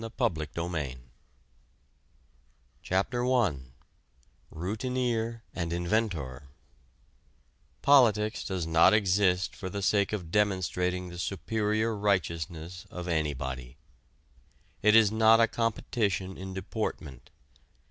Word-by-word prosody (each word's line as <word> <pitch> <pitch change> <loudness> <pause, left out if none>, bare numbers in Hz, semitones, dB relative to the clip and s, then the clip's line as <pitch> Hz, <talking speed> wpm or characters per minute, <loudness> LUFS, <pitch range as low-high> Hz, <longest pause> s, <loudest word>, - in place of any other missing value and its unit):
A 115 - -5
PREFACE 80 -8 -1
TO 85 +1 -2
POLITICS 70 -7 -4 1.8
CHAPTER 105 +7 0
I 110 - +2 0.9
ROUTINEER 115 +4 -2
AND 85 -2 -3
INVENTOR 85 - -2 1.4
Politics 110 -6 +4
does 90 -4 -3
not 80 +5 +5
exist 95 -2 +2
for 95 - -6
the 100 +1 -4
sake 100 0 +2
of 90 -6 -4
demonstrating 90 -3 0
the 85 0 -9
superior 110 +4 -1
righteousness 90 -2 -2
of 90 0 -7
anybody. 65 -5 -3 1.0
It 105 +1 +5
is 110 -2 +6
not 110 +1 +5
a 115 - +5
competition 105 -5 -1
in 95 0 -7
deportment. 90 - -5
95 Hz, 100 wpm, -29 LUFS, 85-110 Hz, 1.8 s, is